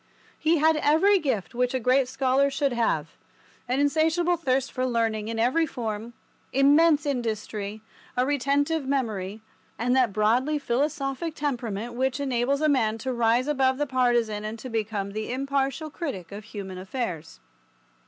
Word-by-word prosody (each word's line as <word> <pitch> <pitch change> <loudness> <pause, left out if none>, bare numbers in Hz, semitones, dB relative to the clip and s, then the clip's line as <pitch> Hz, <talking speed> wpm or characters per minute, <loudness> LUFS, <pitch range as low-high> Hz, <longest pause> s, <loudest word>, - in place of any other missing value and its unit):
He 325 +2 +3
had 315 +1 +4
every 325 +7 +4
gift 220 - -2
which 250 +1 0
a - - +1
great 255 +2 +3
scholar 265 +2 +2
should 275 -1 0
have, 235 -1 0 0.6
an 255 +2 0
insatiable 320 +4 +2
thirst 270 -5 0
for 255 - -2
learning 225 -3 0
in 225 0 -3
every 260 +9 +2
form, 225 -2 -5 0.4
immense 290 +3 +4
industry, 220 -5 -3 0.3
a 250 - +3
retentive 285 +2 0
memory, 220 -7 -2 0.4
and 245 +4 +1
that 255 -5 +3
broadly 235 +9 +2
philosophic 280 +3 -2
temperament 240 -6 -3
which 260 +2 -1
enables 270 +1 0
a 310 - +3
man 225 -7 +2
to 255 +3 -3
rise 235 +2 +2
above 265 -3 +2
the 295 - 0
partisan 240 -5 +1
and 215 +1 -5
to 255 +3 -8
become 215 -3 -2
the 215 +3 -4
impartial 275 +3 -1
critic 270 - -5
of 205 +1 -8
human 195 -4 -7
affairs. 185 - -5
255 Hz, 155 wpm, -26 LUFS, 225-285 Hz, 0.6 s, had